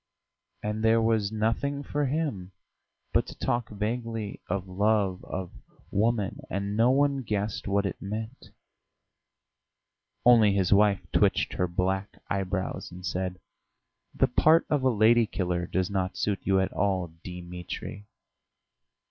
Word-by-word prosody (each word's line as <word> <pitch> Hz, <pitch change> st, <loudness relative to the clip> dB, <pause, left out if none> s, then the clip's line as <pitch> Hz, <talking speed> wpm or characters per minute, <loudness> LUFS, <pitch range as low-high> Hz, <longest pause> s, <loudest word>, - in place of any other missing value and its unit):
And 105 Hz, +1 st, -2 dB
there 115 Hz, +1 st, +5 dB
was 110 Hz, -2 st, +1 dB
nothing 115 Hz, +6 st, -1 dB
for 145 Hz, 0 st, -1 dB
him 125 Hz, -, -2 dB, 0.6 s
but -, -, +2 dB
to -, -, -9 dB
talk 120 Hz, -2 st, -1 dB
vaguely 110 Hz, 0 st, -3 dB
of 95 Hz, +1 st, -2 dB
love, 100 Hz, 0 st, +1 dB
of 95 Hz, -2 st, -5 dB, 0.4 s
woman, 105 Hz, -1 st, +1 dB
and 100 Hz, +1 st, -2 dB
no 115 Hz, +3 st, +4 dB
one 140 Hz, +1 st, +2 dB
guessed 105 Hz, -3 st, -2 dB
what 100 Hz, 0 st, +1 dB
it 100 Hz, -, -4 dB
meant; 110 Hz, +5 st, -6 dB, 1.8 s
only 115 Hz, -4 st, +7 dB
his 95 Hz, -1 st, +3 dB
wife 100 Hz, -1 st, +4 dB
twitched -, -, +2 dB
her 90 Hz, -, 0 dB
black 95 Hz, +3 st, -1 dB
eyebrows, 95 Hz, -1 st, -2 dB
and 90 Hz, +1 st, -9 dB
said: 90 Hz, 0 st, -2 dB, 0.8 s
"The -, -, +4 dB
part 160 Hz, +2 st, +4 dB
of 145 Hz, -2 st, +2 dB
a 130 Hz, -, +3 dB
lady 115 Hz, 0 st, +4 dB
killer 90 Hz, -3 st, -2 dB
does 95 Hz, +1 st, -1 dB
not 95 Hz, -2 st, -1 dB
suit 105 Hz, -2 st, 0 dB
you 95 Hz, -1 st, +2 dB
at 95 Hz, -, 0 dB
all, 95 Hz, -4 st, 0 dB
Dimitri." 90 Hz, +3 st, -7 dB
100 Hz, 135 wpm, -28 LUFS, 95-115 Hz, 1.8 s, only